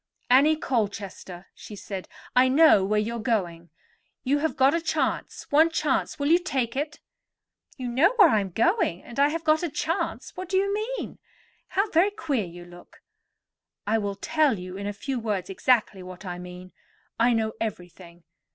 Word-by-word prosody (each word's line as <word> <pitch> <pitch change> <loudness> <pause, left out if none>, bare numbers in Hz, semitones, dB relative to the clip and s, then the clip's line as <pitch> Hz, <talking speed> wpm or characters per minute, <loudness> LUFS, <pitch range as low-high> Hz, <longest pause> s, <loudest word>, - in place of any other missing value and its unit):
"Annie 285 +5 +6
Colchester," 200 - -4
she 210 - -11
said, 195 -1 -7 0.3
"I 255 +1 +6
know 275 -6 +6
where 210 +2 +1
you 230 +3 -2
are - - -6
going. 175 -7 -2 0.5
You 280 +2 +1
have 320 +2 -1
got 270 +2 +4
a 335 - 0
chance, 320 - -2
one 315 +3 +5
chance; 305 -3 -1
will 285 - -2
you 340 +2 +5
take 265 -10 -2
it?" 295 +2 -3 0.8
"You 255 -2 -5
know 280 - +3
where 405 -8 +7
I 215 - +3
am 195 -1 -3
going, 225 - +1
and 240 - -8
I 285 - +6
have 330 +2 -4
got 310 0 +3
a 345 - -2
chance—what 335 +3 -3
do 380 - +1
you 395 +1 +1
mean? 445 +4 -4 0.5
How 395 +3 0
very 345 +5 +4
queer 310 - -2
you 175 0 -11
look!" 175 0 -16 0.8
"I 220 +2 +1
will 200 -1 -3
tell 285 +4 +1
you 180 0 -8
in 200 +1 -5
a - - -1
few 255 +5 -4
words 205 -5 -3
exactly 215 -2 +1
what 185 +1 -10
I 180 -1 -5
mean. 180 +1 -10 0.5
I 240 +1 +4
know 220 -1 0
everything. 175 -5 -7
235 Hz, 180 wpm, -25 LUFS, 195-315 Hz, 0.8 s, where